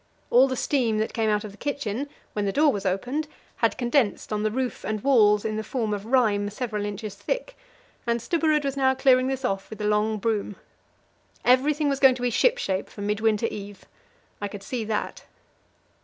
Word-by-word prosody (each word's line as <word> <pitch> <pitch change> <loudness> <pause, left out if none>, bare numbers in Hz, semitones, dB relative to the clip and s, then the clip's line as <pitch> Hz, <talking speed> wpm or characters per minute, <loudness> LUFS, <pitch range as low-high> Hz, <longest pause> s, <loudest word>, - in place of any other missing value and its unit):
All 255 +3 +6
the 260 - -2
steam 240 -4 +1
that 215 +1 -1
came 225 -1 +1
out 210 0 +1
of 210 - -7
the 200 - -17
kitchen, 280 -2 -3 0.2
when 210 -1 -1
the 195 - 0
door 295 +6 +4
was 200 -1 -2
opened, 250 +12 -1 0.3
had - - +1
condensed 240 -4 0
on 210 - -1
the 215 - +1
roof 255 +3 -3
and 215 -1 -3
walls 210 -6 +4
in 215 -1 -1
the 220 - -2
form 220 -2 -2
of 205 +1 -5
rime 215 -5 +2
several 210 -1 -3
inches 205 0 -5
thick, - - -4 0.5
and 235 0 +1
Stubberud 310 +2 +1
was 275 -1 -1
now 265 -1 +2
clearing 260 -1 +4
this 265 -1 -2
off 195 -4 -2
with 220 - -9
a - - -4
long 210 +1 +1
broom. 210 -1 -1 0.9
Everything 285 +4 +3
was 275 -1 0
going 265 -2 +6
to 250 - -6
be 245 - +1
shipshape 235 - +1
for 205 - -10
Midwinter 210 +1 +1
Eve; 200 -1 -8 0.6
I 205 - -1
could 200 -1 -9
see 240 +2 -3
that. 210 -1 -3
225 Hz, 200 wpm, -25 LUFS, 210-265 Hz, 0.9 s, All